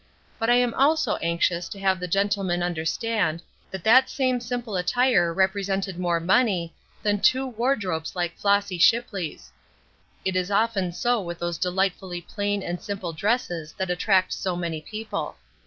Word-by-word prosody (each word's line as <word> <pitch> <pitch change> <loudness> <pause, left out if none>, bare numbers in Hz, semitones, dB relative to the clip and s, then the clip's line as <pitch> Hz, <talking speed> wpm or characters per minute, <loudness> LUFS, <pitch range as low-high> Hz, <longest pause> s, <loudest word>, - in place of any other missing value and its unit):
But 225 - 0
I 240 - +6
am 245 -1 +2
also 310 +3 +2
anxious 170 +1 0
to 200 - -8
have 190 -1 +1
the 180 - -4
gentlemen 195 -1 0
understand 170 +1 -1 0.3
that 190 -3 -7
that 255 +4 +6
same 255 -2 0
simple 240 -2 -4
attire 180 -1 +2
represented 190 0 0
more 175 -2 +1
money 185 -2 +2 0.3
than 205 -1 +1
two 260 +6 +3
wardrobes 215 -10 -1
like 175 -1 -2
Flossy 200 -3 +1
Shipley's. 200 -5 +1 0.7
It 190 -1 0
is 185 +1 0
often 205 -3 +1
so 240 +6 0
with 175 -2 -6
those 175 -2 -3
delightfully 185 -1 -1
plain 205 +2 -2
and 175 0 -4
simple 195 -4 -4
dresses 175 -4 -1
that 190 -2 -3
attract 185 +1 +2
so 185 -2 -2
many 170 -3 -3
people. 215 +6 -5
190 Hz, 155 wpm, -25 LUFS, 175-220 Hz, 0.7 s, I